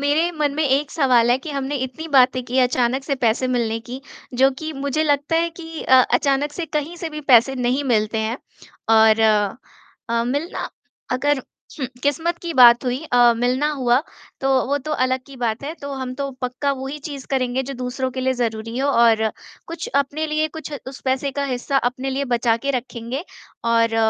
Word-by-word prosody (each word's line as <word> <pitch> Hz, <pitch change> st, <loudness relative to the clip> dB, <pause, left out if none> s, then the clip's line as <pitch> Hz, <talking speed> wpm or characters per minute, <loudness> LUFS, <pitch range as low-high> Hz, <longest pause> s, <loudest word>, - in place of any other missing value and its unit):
मेरे 295 Hz, +4 st, +2 dB
मन 290 Hz, -2 st, +1 dB
में 310 Hz, +1 st, 0 dB
एक 275 Hz, +2 st, +1 dB
सवाल 250 Hz, -5 st, +3 dB
है 245 Hz, -, +3 dB
कि 305 Hz, +4 st, -8 dB
हमने 280 Hz, 0 st, -2 dB
इतनी 320 Hz, +6 st, -9 dB
बातें 255 Hz, 0 st, +4 dB
की 250 Hz, +1 st, -2 dB
अचानक 250 Hz, +1 st, +1 dB
से 280 Hz, -1 st, -1 dB
पैसे 235 Hz, +3 st, +1 dB
मिलने 225 Hz, -1 st, -1 dB
की 255 Hz, +2 st, -5 dB, 0.4 s
जो 270 Hz, -, +6 dB
की 315 Hz, 0 st, -5 dB
मुझे 305 Hz, +3 st, +1 dB
लगता 290 Hz, +2 st, +1 dB
है 335 Hz, +1 st, +1 dB
कि 325 Hz, -1 st, -7 dB
अ 260 Hz, 0 st, +6 dB
अचानक 285 Hz, +1 st, +1 dB
से 335 Hz, +1 st, -4 dB
कहीं 305 Hz, +3 st, -3 dB
से 335 Hz, -, -4 dB
भी 305 Hz, -, -6 dB
पैसे 245 Hz, +3 st, +6 dB
नहीं 255 Hz, +2 st, 0 dB
मिलते 215 Hz, +1 st, 0 dB
हैं। 220 Hz, +3 st, -2 dB, 0.5 s
और 220 Hz, 0 st, +6 dB, 0.9 s
अ, 235 Hz, 0 st, +1 dB
मिलना 285 Hz, +8 st, -3 dB, 0.4 s
अगर 280 Hz, +2 st, +1 dB, 0.6 s
किस्मत 325 Hz, +4 st, 0 dB
की 340 Hz, -, -3 dB
बात 240 Hz, -1 st, +7 dB
हुई 250 Hz, +3 st, -2 dB
अ, 240 Hz, -1 st, +6 dB
मिलना 255 Hz, +5 st, +1 dB
हुआ 255 Hz, -3 st, +2 dB, 0.4 s
तो 270 Hz, -, 0 dB, 0.2 s
वो 285 Hz, +2 st, +1 dB
तो 305 Hz, +3 st, -5 dB
अलग 255 Hz, -1 st, +1 dB
की 275 Hz, -, -12 dB
बात 235 Hz, -1 st, -2 dB
है। 300 Hz, -, -4 dB
तो 280 Hz, 0 st, -5 dB
हम 260 Hz, -1 st, -4 dB
तो 275 Hz, +1 st, -3 dB
पक्का 250 Hz, +3 st, -1 dB
वो 265 Hz, -1 st, -5 dB
ही 285 Hz, +3 st, -5 dB
चीज़ 280 Hz, -3 st, -8 dB
करेंगे 260 Hz, -1 st, 0 dB
जो 275 Hz, +1 st, -6 dB
दूसरों 255 Hz, +1 st, -3 dB
के 260 Hz, -, -5 dB
लिए 260 Hz, 0 st, +1 dB
ज़रूरी 225 Hz, 0 st, -3 dB
हो 275 Hz, +2 st, +1 dB
और 225 Hz, -3 st, +4 dB, 0.4 s
कुछ 335 Hz, 0 st, -6 dB
अपने 300 Hz, +3 st, -4 dB
लिए 310 Hz, 0 st, 0 dB
कुछ 310 Hz, -, -8 dB, 0.2 s
उस 265 Hz, -, -10 dB
पैसे 265 Hz, +1 st, 0 dB
का -, -, 0 dB
हिस्सा 265 Hz, +1 st, -2 dB
अपने 260 Hz, +2 st, -5 dB
लिए 275 Hz, +1 st, -1 dB
बचा 230 Hz, -1 st, +2 dB
के -, -, +2 dB
रखेंगे 245 Hz, +4 st, -6 dB, 0.5 s
और 230 Hz, -1 st, +2 dB
265 Hz, 195 wpm, -21 LUFS, 245-290 Hz, 0.9 s, बात